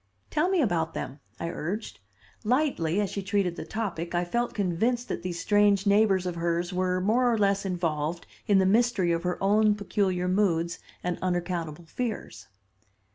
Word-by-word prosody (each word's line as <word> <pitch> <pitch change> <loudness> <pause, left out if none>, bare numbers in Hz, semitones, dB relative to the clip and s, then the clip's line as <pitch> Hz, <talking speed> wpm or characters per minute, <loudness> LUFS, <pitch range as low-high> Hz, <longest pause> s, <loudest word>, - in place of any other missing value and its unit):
"Tell 310 +5 +2
me 370 -5 +3
about 170 -7 0
them," 135 +3 -5 0.2
I 170 - -3
urged. 190 +7 -4 0.4
Lightly 220 - +1
as 205 -3 0
she 200 - -3
treated 195 -3 0
the - - -6
topic 175 -6 -3
I 175 0 +1
felt 235 +7 -1
convinced 225 +6 0
that - - -3
these 175 -2 -4
strange 205 0 +3
neighbors 200 -2 +4
of 180 - -1
hers 170 +1 -1
were 185 0 +1
more 240 +6 +3
or 230 - +1
less 200 -1 +2
involved 170 -2 -2 0.2
in 205 - +5
the 190 - +4
mystery 210 -3 +3
of 165 0 0
her 180 0 -1
own 210 +1 +4
peculiar 190 -3 0
moods 175 -3 +1 0.2
and 180 -1 -2
unaccountable 175 -3 -2
fears. 215 - -5
185 Hz, 170 wpm, -27 LUFS, 175-210 Hz, 0.4 s, in